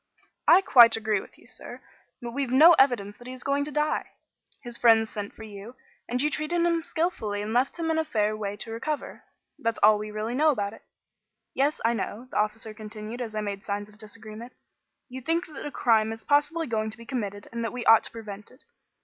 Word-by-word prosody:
"I 360 Hz, +3 st, +8 dB
quite 235 Hz, -10 st, +7 dB
agree 215 Hz, -2 st, 0 dB
with -, -, -16 dB
you, -, -, -20 dB
sir. -, -, -9 dB, 0.4 s
But 235 Hz, -, -5 dB
we've 275 Hz, +1 st, -2 dB
no 305 Hz, +7 st, +8 dB
evidence 220 Hz, -7 st, +2 dB
that 245 Hz, 0 st, -13 dB
he 255 Hz, -, -6 dB
is 255 Hz, -, -6 dB
going 280 Hz, +1 st, +1 dB
to 300 Hz, -, -6 dB
die. 300 Hz, +1 st, -1 dB, 0.5 s
His 240 Hz, -2 st, -3 dB
friends 225 Hz, -2 st, +4 dB
sent 205 Hz, -1 st, -5 dB
for 220 Hz, -, -10 dB
you, 215 Hz, +3 st, -10 dB, 0.3 s
and 250 Hz, +1 st, -1 dB
you 300 Hz, +3 st, +1 dB
treated 335 Hz, +3 st, 0 dB
him 335 Hz, -1 st, +2 dB
skilfully 320 Hz, -, -2 dB
and 215 Hz, +1 st, -4 dB
left 255 Hz, +6 st, +1 dB
him 325 Hz, -1 st, -1 dB
in 320 Hz, -, +1 dB
a -, -, +2 dB
fair 215 Hz, -8 st, 0 dB
way 205 Hz, -1 st, -4 dB
to 225 Hz, +2 st, -5 dB
recovery. 290 Hz, +7 st, -4 dB, 0.4 s
That's 230 Hz, 0 st, -1 dB
all 210 Hz, 0 st, +7 dB
that -, -, -7 dB
we 215 Hz, 0 st, -5 dB
really 215 Hz, +2 st, -4 dB
know 305 Hz, +5 st, +3 dB
about 205 Hz, -7 st, -1 dB
it. -, -, -14 dB, 0.7 s
Yes, 285 Hz, +3 st, +1 dB
I 230 Hz, -, +3 dB
know," 230 Hz, +2 st, -4 dB
the -, -, -3 dB
officer 215 Hz, +1 st, -1 dB
continued 215 Hz, +2 st, -8 dB
as 220 Hz, -3 st, -5 dB
I 215 Hz, -, -1 dB
made 200 Hz, -1 st, -5 dB
signs 205 Hz, 0 st, -4 dB
of 210 Hz, +1 st, -20 dB
disagreement, 220 Hz, +2 st, -10 dB, 0.5 s
"you 260 Hz, 0 st, -8 dB
think 330 Hz, +6 st, 0 dB
that 300 Hz, -2 st, -8 dB
a -, -, -6 dB
crime 220 Hz, -4 st, +2 dB
is 225 Hz, 0 st, -7 dB
possibly 295 Hz, +3 st, +2 dB
going 220 Hz, -3 st, -1 dB
to 220 Hz, -, -7 dB
be 230 Hz, -, -12 dB
committed 205 Hz, -5 st, -4 dB
and 235 Hz, 0 st, -4 dB
that 230 Hz, -, -2 dB
we 250 Hz, -1 st, -5 dB
ought 225 Hz, -1 st, +7 dB
to -, -, -5 dB
prevent 210 Hz, -3 st, -9 dB
it. 255 Hz, -, -18 dB
230 Hz, 230 wpm, -26 LUFS, 215-275 Hz, 0.7 s, I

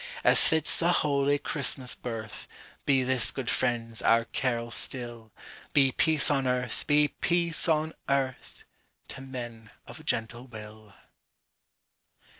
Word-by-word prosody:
As -, -, +6 dB
fits 160 Hz, -2 st, +4 dB
the 170 Hz, +1 st, +2 dB
holy 145 Hz, -3 st, +1 dB
Christmas 135 Hz, -3 st, -3 dB
birth, 110 Hz, -3 st, -7 dB, 0.4 s
Be 135 Hz, -2 st, +3 dB
this, 125 Hz, -2 st, +2 dB
good 130 Hz, -3 st, -3 dB
friends, 115 Hz, -3 st, -2 dB
our 115 Hz, 0 st, +3 dB
carol 120 Hz, -2 st, -3 dB
still—Be 120 Hz, +3 st, -2 dB
peace 155 Hz, +1 st, +5 dB
on 135 Hz, -2 st, 0 dB
earth, 125 Hz, -2 st, -2 dB
be 150 Hz, 0 st, +3 dB
peace 170 Hz, +1 st, -1 dB
on 155 Hz, 0 st, 0 dB, 0.2 s
earth, 135 Hz, -2 st, -3 dB, 0.5 s
To -, -, -8 dB
men 120 Hz, -4 st, -8 dB, 0.2 s
of -, -, -12 dB
gentle 120 Hz, +3 st, -3 dB
will. 110 Hz, -2 st, -12 dB
130 Hz, 120 wpm, -27 LUFS, 115-145 Hz, 0.5 s, As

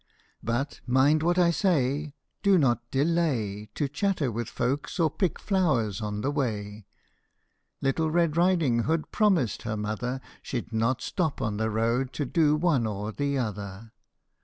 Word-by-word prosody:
But 120 Hz, +5 st, -2 dB
mind 135 Hz, +5 st, +4 dB
what 175 Hz, +2 st, +2 dB
I 175 Hz, -1 st, +5 dB
say 150 Hz, -5 st, 0 dB, 0.3 s
do 200 Hz, -2 st, +5 dB
not 120 Hz, -5 st, +1 dB
delay 135 Hz, -9 st, 0 dB
To 145 Hz, -, 0 dB
chatter 150 Hz, -2 st, 0 dB
with 115 Hz, 0 st, -4 dB
folks 135 Hz, +9 st, -2 dB
or 160 Hz, -3 st, +3 dB
pick 185 Hz, 0 st, -1 dB
flowers 130 Hz, -, 0 dB
on 105 Hz, -1 st, -3 dB
the 140 Hz, -, 0 dB
way! 105 Hz, -7 st, -3 dB, 0.4 s
" -, -, -49 dB
Little 155 Hz, +4 st, +1 dB
Red 165 Hz, -1 st, +2 dB
Riding 170 Hz, -10 st, +2 dB
Hood 160 Hz, +1 st, -1 dB
promised 190 Hz, -, +2 dB
her 110 Hz, -1 st, -3 dB
mother 110 Hz, +5 st, -3 dB, 0.2 s
She 125 Hz, -, -3 dB
'd 115 Hz, -, -16 dB
not 115 Hz, +3 st, 0 dB
stop 165 Hz, -7 st, -1 dB
on 105 Hz, -1 st, -2 dB
the 110 Hz, +1 st, 0 dB
road 115 Hz, +4 st, 0 dB
to 145 Hz, -, -2 dB
do 150 Hz, +2 st, +3 dB
one 150 Hz, -8 st, +2 dB
or 105 Hz, 0 st, -4 dB
the 140 Hz, +4 st, -1 dB
other. 105 Hz, -2 st, -5 dB
135 Hz, 160 wpm, -27 LUFS, 110-160 Hz, 0.4 s, I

